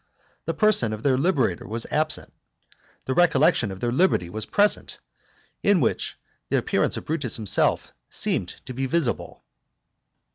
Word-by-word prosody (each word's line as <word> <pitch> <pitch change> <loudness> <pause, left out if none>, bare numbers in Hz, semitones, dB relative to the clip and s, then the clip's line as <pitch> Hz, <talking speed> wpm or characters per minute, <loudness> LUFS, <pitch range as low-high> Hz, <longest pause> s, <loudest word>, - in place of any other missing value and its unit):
The - - -2
person 215 - +3
of 110 - -7
their 135 -2 +3
liberator 130 - 0
was 115 +2 -4
absent, 155 +1 -1 0.7
the 130 - -1
recollection 140 -8 +3
of 95 - -8
their 120 - 0
liberty 125 - +2
was 110 +2 -3
present, 205 +1 +1 0.6
in 200 -2 +3
which - - -1 0.3
the - - +2
appearance - - 0
of - - -7
Brutus 150 -7 -1
himself 105 -4 +1 0.2
seemed - - -1 0.2
to 130 - -7
be 135 +2 -2
visible. 140 -4 -2
130 Hz, 145 wpm, -24 LUFS, 115-165 Hz, 0.7 s, person